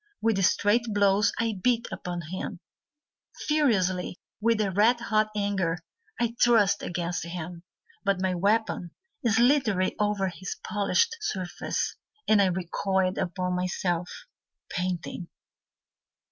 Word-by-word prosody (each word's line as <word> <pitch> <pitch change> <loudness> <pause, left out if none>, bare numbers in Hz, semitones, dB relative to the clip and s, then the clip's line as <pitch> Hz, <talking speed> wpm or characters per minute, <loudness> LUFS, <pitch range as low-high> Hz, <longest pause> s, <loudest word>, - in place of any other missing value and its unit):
With 220 -4 +1
straight 205 +5 +3
blows 205 -1 +3
I 225 -4 -1
beat 235 0 +2
upon 175 -1 -4
him, 185 - -4 0.9
Furiously, 190 - +1 0.2
with 230 0 +3
red 210 +4 +3
hot 215 -2 +2
anger, 195 -5 0 0.4
I 235 -1 0
thrust 225 -5 +4
against 175 0 -3
him. 170 0 -6 0.4
But 195 -2 +1
my 185 0 +1
weapon 200 -1 0 0.3
slithered 230 -4 +3
over 205 -2 +1
his 180 +1 -6
polished 220 - +1
surface, 185 - -2 0.3
And 215 -2 +5
I 195 - +4
recoiled 185 +1 0
upon 180 0 -1
myself, 180 -1 -2 0.5
Panting. 180 -1 -3
195 Hz, 110 wpm, -27 LUFS, 180-220 Hz, 0.9 s, And